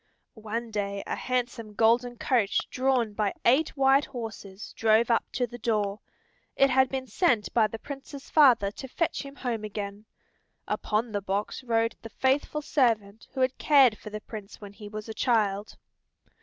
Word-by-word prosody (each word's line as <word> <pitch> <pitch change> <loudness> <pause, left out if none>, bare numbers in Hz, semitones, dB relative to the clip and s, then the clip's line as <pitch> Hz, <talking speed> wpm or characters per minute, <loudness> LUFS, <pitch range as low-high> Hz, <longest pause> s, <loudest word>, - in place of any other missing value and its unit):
One 225 +1 -5
day 200 -1 -3
a - - -3
handsome 240 -4 -3
golden 240 +2 +2
coach 225 -6 +1
drawn 255 -4 +1
by 205 -1 -1
eight 285 +6 +3
white 270 +1 +4
horses 215 -5 -8
drove 225 +2 +3
up 230 - +2
to 250 - 0
the 240 0 -10
door. 210 -3 0 0.6
It 275 0 +4
had 260 0 +4
been 265 -1 -3
sent 250 - +1
by 225 -2 +4
the 225 - -7
Prince's 275 +3 -9
father 245 -10 +5
to 265 - -8
fetch 335 +6 -1
him 275 0 -10
home 235 -6 -3
again. 205 0 -6 0.6
Upon 220 +2 -1
the 205 -1 -2
box 200 +6 -3
rode 230 -2 0
the 225 - -9
faithful 275 +5 0
servant 225 -7 0
who 260 - -1
had 255 0 +1
cared 270 -7 +5
for 215 - -10
the 215 0 -6
Prince 210 -2 -9
when 205 -1 -10
he 205 0 -10
was 215 +1 -7
a 220 - -5
child. 210 -4 0
230 Hz, 170 wpm, -27 LUFS, 210-260 Hz, 0.6 s, father